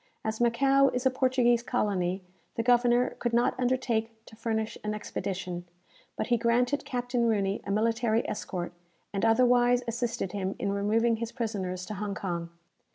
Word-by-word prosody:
As 220 +1 -2
Macao 270 +4 +4
is 250 +1 -3
a 260 - +5
Portuguese 255 -2 +3
colony, 195 -7 -1 0.3
the 230 - -1
governor 245 0 +4
could 240 -1 -1
not 240 +1 +3
undertake 245 -3 +1 0.2
to - - -14
furnish 220 -1 -2
an 210 0 -2
expedition; 185 -4 -4 0.5
but - - -2
he - - +5
granted 245 +5 +1
Captain 245 -1 0
Rooney 200 -2 0
a - - -6
military 225 +2 +1
escort, 175 -4 -4 0.4
and 195 - -2
otherwise 245 +1 +4
assisted 230 -5 -2
him 195 -1 -3
in 200 - -1
removing 225 +3 +2
his 230 0 -4
prisoners 200 -7 -3
to 210 - -6
Hong 200 0 -4
Kong. 170 -4 -3
230 Hz, 160 wpm, -28 LUFS, 200-245 Hz, 0.5 s, a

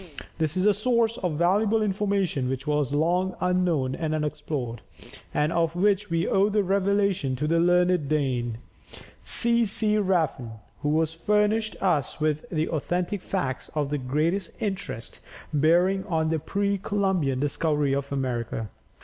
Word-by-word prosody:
This 160 +2 0
is 185 - +1
a 210 - +5
source 230 +1 +1
of 180 -4 -1
valuable 205 +6 +2
information 195 -9 0
which 130 +1 -3
was 150 -3 0
long 175 +5 +1
unknown 180 -8 +1
and 155 +1 -2
unexplored, 150 -6 -3 0.5
and 150 +2 0
of 165 0 +1
which 200 +2 +2
we 165 0 0
owe 195 +2 +3
the 210 0 +1
revelation 195 -6 +1
to 145 +4 -2
the 165 +2 +2
learned 175 -3 +3
Dane, 125 -6 0 0.7
C. 235 0 +2
C. 215 0 +1
Rafn, 160 - 0 0.3
who 150 +2 +1
has 160 0 -1
furnished 210 +5 +1
us 165 -7 +1
with 155 -1 -1
authentic 175 +4 -1
facts 135 -11 -3
of 145 -2 -1
the 145 - 0
greatest 155 +8 -1
interest 190 - -4 0.3
bearing 175 +6 +3
on 160 -3 0
the 160 0 0
pre 200 +5 -1
Columbian 190 -10 0
discovery 145 0 0
of 140 0 -2
America. 120 -5 -2
170 Hz, 145 wpm, -26 LUFS, 145-195 Hz, 0.7 s, a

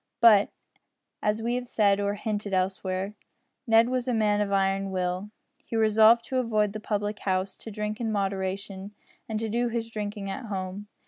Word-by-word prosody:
But, 220 -3 +7 0.7
as 215 +1 0
we 235 +1 0
have 250 0 -2
said 200 -4 +3
or 200 0 0
hinted 205 -2 -2
elsewhere, 185 +1 -1 0.5
Ned 225 +1 +6
was 255 0 -1
a 250 - +1
man 210 -1 +2
of 200 -1 -1
iron 195 0 +1
will. 185 +1 -2 0.3
He - - -6
resolved 220 +1 +5
to 260 - -2
avoid 215 -5 +1
the 215 - -4
public 210 0 -2
house, 190 0 -1
to - - -9
drink 210 +1 -4
in 225 -2 -1
moderation, 195 0 -3 0.3
and 215 -1 -1
to 225 - -2
do 240 +3 0
his 230 -1 -3
drinking 210 -2 -4
at 195 +6 -5
home. 195 0 -5
210 Hz, 180 wpm, -27 LUFS, 195-225 Hz, 0.7 s, But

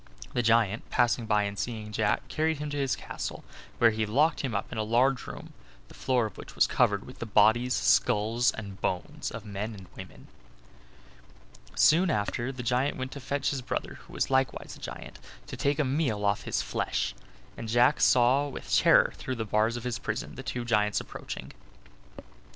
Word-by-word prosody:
The 120 - +1
giant, 115 -2 +2
passing 120 -1 +1
by 105 -1 +3
and 100 -1 -4
seeing 110 0 -4
Jack, 105 0 0
carried 160 0 0
him 150 0 -5
to 145 - -3
his 135 -2 0
castle, - - -6 0.3
where 115 -1 +5
he 110 0 -1
locked 145 +9 +2
him 130 -6 -3
up 100 - -3
in 110 - -4
a - - +1
large 125 +4 +2
room, - - -9 0.4
the - - -14
floor 125 -3 +1
of 105 - -8
which - - -10
was - - +5
covered 100 -1 +1
with 125 - -12
the 115 - -5
bodies, 110 +4 +4
skulls 115 +4 +3
and 100 -3 -8
bones 90 -1 -3
of 115 -1 -8
men 105 +2 -5
and 95 -2 -11
women. - - -11 1.5
Soon 170 +5 +5
after 120 +2 -1
the 130 -2 -7
giant 125 +4 0
went 130 0 -4
to 140 - -7
fetch 140 +1 -1
his 135 - -3
brother - - -4
who - - -14
was - - -1
likewise 130 0 0
a - - -15
giant, - - -8 0.3
to - - -7
take 140 0 0
a 150 - +2
meal 130 -7 0
off 100 0 0
his - - -1
flesh; - - -2 0.4
and 115 - -7
Jack 120 +5 +4
saw 130 +3 +4
with 140 - -3
terror - - +5
through 130 - -4
the 115 -2 -3
bars 110 +3 +1
of 120 - -7
his 120 -3 -3
prison 105 - -4
the - - -7
two 125 -2 -4
giants 105 -3 +2
approaching. - - -8
120 Hz, 195 wpm, -28 LUFS, 105-130 Hz, 1.5 s, where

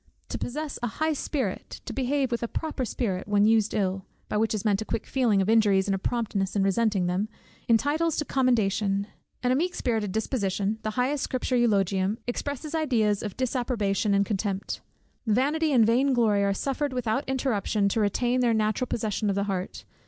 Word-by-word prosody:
To - - -4
possess 300 +3 -4
a 240 - 0
high 315 0 +1
spirit, 285 -1 -3
to - - -5
behave 270 0 0
with 235 - -1
a 235 - -1
proper 300 -1 -3
spirit 195 -5 -2
when 205 0 +3
used 220 -1 +3
ill, 190 -2 -1 0.2
by - - 0
which 220 +1 +1
is 215 - -4
meant 205 -1 +2
a - - -1
quick 230 - -3
feeling 225 -7 +2
of - - -3
injuries, 210 -3 +4
and 200 - +1
a 195 - -1
promptness 210 -3 -1
in 200 - +2
resenting 195 -1 +2
them, 185 +4 -1 0.4
entitles 295 +8 +2
to 300 - 0
commendation; 210 -7 +1 0.4
and 250 0 +3
a - - +2
meek 355 +6 0
spirited 220 -5 -1
disposition, 210 -1 -1
the 215 - -2
highest 265 +3 +1
Scripture 255 0 -1
eulogium, 200 -3 +2
expresses 285 +4 -4
ideas 230 -10 +1
of 210 -3 -6
disapprobation 235 -6 0
and 200 0 +3
contempt. 200 -1 -2 0.5
Vanity 290 +8 +2
and 240 -5 +5
vain 260 +5 +3
glory 215 -5 +3
are 200 - +2
suffered 275 +6 -2
without 250 +2 0
interruption 220 -6 0
to 200 - 0
retain 240 +4 +1
their 240 -2 +3
natural 215 +3 0
possession 215 -2 -1
of 195 - 0
the 200 - +1
heart. 190 -2 -4
220 Hz, 190 wpm, -27 LUFS, 200-255 Hz, 0.5 s, and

